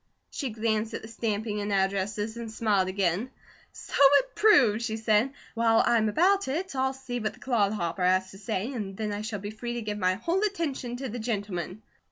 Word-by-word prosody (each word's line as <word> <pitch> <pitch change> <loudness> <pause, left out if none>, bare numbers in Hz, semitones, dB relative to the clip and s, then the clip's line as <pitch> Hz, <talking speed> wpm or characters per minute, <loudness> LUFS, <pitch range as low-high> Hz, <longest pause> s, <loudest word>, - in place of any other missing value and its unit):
'" - - -49
She 280 -5 -3
glanced 220 0 -1
at - - -6
the - - -8
stamping 220 -2 -2
and 205 0 -3
addresses 200 +2 0
and 235 -1 -6
smiled 210 -4 +1
again: 190 +4 0 0.4
"So - - -11
it 285 - +6
proves," 250 - +5
she 220 -1 -2
said. 220 +3 +2 0.2
"While 225 -1 +3
I'm 220 -2 +3
about 385 - +3
it, 320 +4 -3
I'll 265 0 +1
see 260 -2 -5
what 215 -1 -2
the - - -20
'clod 220 -6 +1
hopper' 175 -2 -2
has 185 +1 +2
to 195 - -12
say, 215 +4 -3
and 195 -5 -5
then 215 -1 -2
I 205 - -3
shall 215 -1 -4
be 205 +1 -6
free 240 +2 -5
to 240 - -3
give 210 -1 -3
my 185 -1 +2
whole 335 - -1
attention 320 - -2
to 265 +2 -4
the 240 +1 -5
'gentleman.'" 205 -4 -3
220 Hz, 215 wpm, -28 LUFS, 205-245 Hz, 0.4 s, it